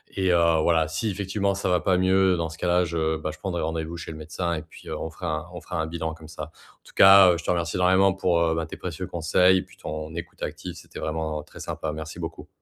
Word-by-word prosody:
et 95 -2 +2
heu, 85 - +5 0.2
voilà, 80 -1 +3
si 85 +8 -2
effectivement 100 0 -1
ça 100 - -2
va 90 -2 +2
pas 95 -2 +2
mieux, 95 0 +4
dans 85 -1 -1
ce 80 - -10
cas-là 90 0 +2
je 80 -1 -1
bah 80 - -4
je - - -13
prendrai 90 -3 -3
rendez-vous 80 +1 -3
chez 85 - -7
le 80 - -8
médecin 85 +3 -3
et 80 - -3
puis - - -15
heu, - - -4
on 80 - -4
fera 80 0 -4
on 90 - -6
fera 85 -1 -4
un - - -1
bilan, 80 -1 -3
comme 80 -1 -13
ça. 80 - -7
En 80 - -21
tout - - -17
cas, 95 -1 +9
heu, - - -1
je 85 - -8
te - - -5
remercie 85 -2 0
énormément 95 +1 +4
pour, 90 -2 +1
heu, 80 -1 +2
bah, 80 - -1
tes 80 - -9
précieux 90 0 -5
conseils 90 +3 +3
et - - 0
puis - - -15
ton 80 +1 -6
écoute 85 0 -8
active, 90 -1 -5
c'était 90 - -11
vraiment 80 -1 -3
très - - -14
sympa. 80 - -4
Merci 80 +2 -7
beaucoup. 80 0 -6
85 Hz, 265 wpm, -25 LUFS, 80-90 Hz, 0.2 s, cas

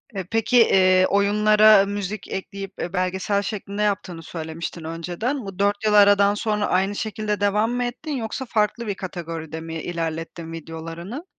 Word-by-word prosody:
E, 190 - -2
peki, 225 +6 +1
eee, 185 -5 +5
oyunlara 210 0 +5
müzik 205 0 -4
ekleyip, 195 0 -6
eee, 175 - -4
belgesel 190 +2 0
şeklinde 205 0 -4
yaptığını 185 -5 -1
söylemiştin 160 +1 -6
önceden. 175 - -3
Bu 195 -1 -8
4 205 +2 +1
yıl 215 - +3
aradan 205 0 +6
sonra 210 0 -1
aynı 190 +2 +1
şekilde 215 -1 -2
devam 210 +3 +2
mı 245 0 -1
ettin 245 +6 -5
yoksa 230 +3 -4
farklı 225 0 0
bir 200 - -2
kategoride 165 -4 -6
mi 160 -1 -6
ilerlettin 165 0 -4
videolarını? 165 - -7
200 Hz, 155 wpm, -23 LUFS, 175-210 Hz, -, aradan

